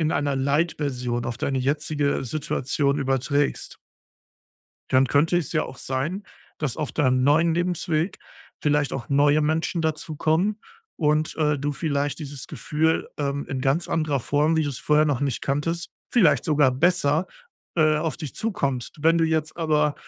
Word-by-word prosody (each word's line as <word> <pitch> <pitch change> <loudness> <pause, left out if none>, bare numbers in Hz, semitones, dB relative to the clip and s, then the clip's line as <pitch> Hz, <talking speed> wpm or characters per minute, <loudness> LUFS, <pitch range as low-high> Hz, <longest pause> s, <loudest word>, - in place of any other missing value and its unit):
in 160 0 +1
einer 145 -2 0
Light-Version 135 -4 -1
auf 120 0 -4
deine 135 0 -1
jetzige 145 +1 0
Situation 140 +1 -1
überträgst 140 +1 -1 1.1
dann 130 +1 +4
könnte 160 +6 +2
es 165 - -4
ja - - +1
auch 130 - -9
sein, 155 +10 -3 0.4
dass 150 -6 -2
auf 150 -3 -3
deinem 130 -4 +2
neuen 160 +3 +4
Lebensweg 175 -1 -1 0.4
vielleicht 145 -1 +1
auch 120 -3 -5
neue 145 +2 +4
Menschen 160 +2 0
dazu 155 -1 -2
kommen 185 +9 +1 0.4
und, 155 0 +1
äh, 150 -2 +1
du 145 +1 -2
vielleicht 145 -1 -1
dieses 140 -4 -7
Gefühl, 160 +2 -1
ähm, 140 0 -2
in 130 -1 -3
ganz 140 +6 0
anderer 155 -4 0
Form, 150 +6 +1
wie 160 - +3
du 145 - -1
es 130 - -4
vorher 150 0 +3
noch 140 -4 0
nicht 140 -4 -1
kanntest 165 +5 -2 0.2
vielleicht 200 -11 +4
sogar 150 -5 +3
besser, 160 +3 +2 0.5
äh, 155 -2 +3
auf 155 0 -2
dich 150 -6 -6
zukommt. 140 - -2
Wenn 165 +2 +4
du 165 - +3
jetzt 160 -1 -1
aber 150 -3 +1
150 Hz, 160 wpm, -24 LUFS, 140-160 Hz, 1.1 s, dann